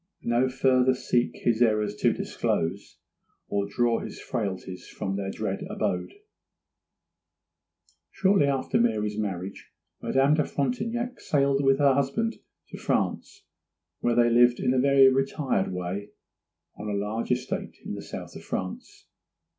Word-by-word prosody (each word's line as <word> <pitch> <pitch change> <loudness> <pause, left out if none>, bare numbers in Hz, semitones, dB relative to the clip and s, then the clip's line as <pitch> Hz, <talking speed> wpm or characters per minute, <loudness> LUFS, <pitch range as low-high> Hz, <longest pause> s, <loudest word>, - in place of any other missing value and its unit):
'No 120 +2 +2
farther 130 0 +3
seek 120 -1 0
his 115 -1 +2
errors 105 -3 +3
to - - +3
disclose, 90 +5 -2 0.5
Or 100 0 0
draw 115 +3 +1
his - - -7
frailties 95 -5 -4
from 95 - -4
their 100 -1 -3
dread - - -3
abode.' 90 - -2 1.9
Shortly 190 -6 +3
after 135 -2 0
Mary's 105 -2 0
marriage 95 -2 -4 0.3
Madame 135 +2 +3
de 155 0 +3
Frontignac 230 - -2
sailed 140 -1 +1
with 135 0 +4
her 140 -1 +4
husband 140 - 0 0.3
to - - -9
France, - - -2 0.6
where 120 - +1
they 120 0 +4
lived 120 +1 +5
in 125 -1 +1
a 130 - +2
very 135 0 +6
retired 135 -5 +1
way 90 +3 -4 0.7
on 105 +1 -6
a - - -2
large 105 +4 -2
estate 125 - -2
in - - -4
the - - -5
south - - -8
of - - -9
France. 90 0 -6
120 Hz, 140 wpm, -27 LUFS, 105-135 Hz, 1.9 s, very